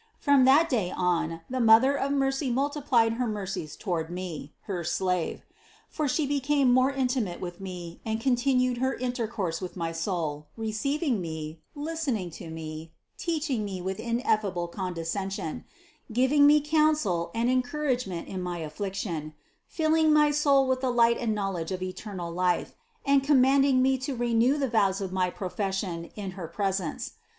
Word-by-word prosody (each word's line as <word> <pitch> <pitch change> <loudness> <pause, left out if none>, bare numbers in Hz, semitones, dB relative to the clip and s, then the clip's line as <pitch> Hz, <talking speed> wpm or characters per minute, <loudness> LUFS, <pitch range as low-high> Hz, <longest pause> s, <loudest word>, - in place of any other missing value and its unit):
From 280 -3 +4
that 290 +5 +6
day 225 - 0
on 170 -3 -1
the 260 0 -3
Mother 230 +4 +6
of 280 0 -1
mercy 270 0 +1
multiplied 260 -3 +2
her 245 +1 -1
mercies 195 -7 -4
toward 170 -5 -2
me, 175 -5 -6
her 180 -3 -4
slave; 175 0 -1 0.5
for 305 -2 -1
She 290 +3 +1
became 280 -1 +2
more 255 +1 +4
intimate 250 -8 -1
with 175 0 -7
me 175 -3 -7
and 220 0 -2
con 250 +1 +2
tinued 250 -1 +1
her 260 +1 0
intercourse 230 -9 -2
with 185 0 -6
my 165 -1 -2
soul, 165 -3 -3
receiving 235 - -1
me, 160 -1 -6 0.2
listen 300 -4 -2
ing 180 -4 -6
to 165 +1 -9
me, 160 0 -7 0.3
teaching 310 - -1
me 195 -2 -4
with 190 +1 -4
ineffable 215 -7 0
condescension, 180 0 -4 0.5
giv 255 +4 +2
ing 285 -1 +7
me 300 +1 +6
counsel 300 - +2
and 230 +1 +1
encouragement 255 - -1
in 190 -1 -5
my 180 -1 -3
affliction, 165 -1 -4 0.3
filling 315 -1 +2
my 300 -1 +5
soul 285 -2 +4
with 260 0 0
the 260 - +1
light 235 -1 +4
and 225 -3 0
knowledge 195 -5 -2
of 185 0 -3
eternal 185 -2 -5
life 180 +1 0 0.3
and 275 -1 +4
commanding 270 -1 +4
me 265 0 +2
to 265 +1 -3
renew 240 +3 +2
the 275 -2 0
vows 200 -5 +2
of 190 -2 -4
my 185 -1 +1
profession 190 -2 -3
in 200 -3 -5
her 180 -3 -7
presence. 190 -1 -2
220 Hz, 160 wpm, -27 LUFS, 180-270 Hz, 0.5 s, ing